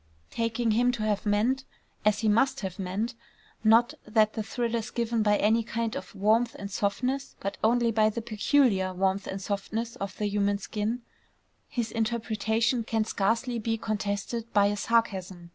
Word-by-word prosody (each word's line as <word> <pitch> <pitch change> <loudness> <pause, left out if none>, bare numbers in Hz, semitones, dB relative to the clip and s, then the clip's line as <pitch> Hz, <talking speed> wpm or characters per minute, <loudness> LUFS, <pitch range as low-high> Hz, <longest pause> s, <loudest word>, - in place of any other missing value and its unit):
Taking 230 0 0
him 245 +3 +3
to 225 -3 -3
have 210 -1 0
meant 230 +6 +2 0.4
as 210 0 +2
he 220 - +1
must 265 +6 +3
have 190 -2 -5
meant, 195 +6 -2 0.5
not 230 +2 +5
that 215 0 +2
the 220 - -2
thrill 235 +2 -2
is 230 -1 -1
given 235 -1 -1
by 210 -1 +3
any 220 +3 +3
kind 230 0 -3
of 185 - -7
warmth 220 +4 +2
and 200 0 -6
softness, 250 +8 -1
but 195 - -4
only 235 +1 +3
by 215 -1 +3
the 225 +1 -4
peculiar 215 -4 +2
warmth 190 +1 0
and 190 - -4
softness 215 +5 -3
of 195 -3 -5
the 210 - -1
human 205 0 +1
skin, 215 +4 -3 0.6
his 240 -5 -3
interpretation 225 +1 0
can 220 -1 0
scarcely 230 +4 0
be 225 +1 -1
contested 215 +2 -3
by 205 -1 +5
a 205 +1 +1
sarcasm. 190 -6 -1
220 Hz, 170 wpm, -28 LUFS, 205-235 Hz, 0.6 s, not